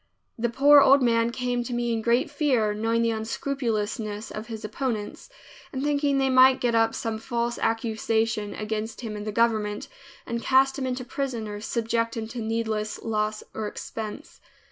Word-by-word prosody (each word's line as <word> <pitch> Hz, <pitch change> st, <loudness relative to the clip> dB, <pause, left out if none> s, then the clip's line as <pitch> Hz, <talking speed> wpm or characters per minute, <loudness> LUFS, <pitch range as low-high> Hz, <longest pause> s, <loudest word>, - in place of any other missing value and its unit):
The 235 Hz, +1 st, -1 dB
poor 285 Hz, +4 st, +7 dB
old 275 Hz, 0 st, +6 dB
man 230 Hz, -1 st, +3 dB
came 245 Hz, 0 st, -2 dB
to 245 Hz, -, -5 dB
me 240 Hz, -1 st, 0 dB
in 225 Hz, -, -1 dB
great 235 Hz, +5 st, +2 dB
fear, 255 Hz, -8 st, +1 dB
knowing 225 Hz, +2 st, 0 dB
the 230 Hz, -, +2 dB
unscrupulousness 220 Hz, -2 st, -3 dB
of 215 Hz, +2 st, -6 dB
his 220 Hz, -2 st, -6 dB
opponents, 215 Hz, -1 st, -4 dB, 0.4 s
and 265 Hz, 0 st, -3 dB
thinking 285 Hz, -1 st, +1 dB
they 270 Hz, 0 st, +2 dB
might 260 Hz, 0 st, +6 dB
get 240 Hz, -1 st, +1 dB
up 225 Hz, 0 st, +3 dB
some 225 Hz, -1 st, -3 dB
false 235 Hz, 0 st, -2 dB
accusation 225 Hz, -1 st, 0 dB
against 220 Hz, +2 st, -4 dB
him 220 Hz, -3 st, -5 dB
in 210 Hz, 0 st, -6 dB
the 215 Hz, -, -2 dB
government 215 Hz, -2 st, 0 dB, 0.4 s
and 235 Hz, 0 st, -3 dB
cast 270 Hz, +3 st, +3 dB
him 260 Hz, -, -2 dB
into 250 Hz, 0 st, -3 dB
prison 250 Hz, -4 st, -3 dB
or 205 Hz, 0 st, -6 dB
subject 230 Hz, +1 st, -1 dB
him 220 Hz, -1 st, -3 dB
to 240 Hz, -, -6 dB
needless 220 Hz, -1 st, -2 dB
loss 215 Hz, -1 st, -1 dB
or 215 Hz, -1 st, -3 dB
expense. 215 Hz, 0 st, -7 dB
230 Hz, 175 wpm, -26 LUFS, 220-250 Hz, 0.4 s, poor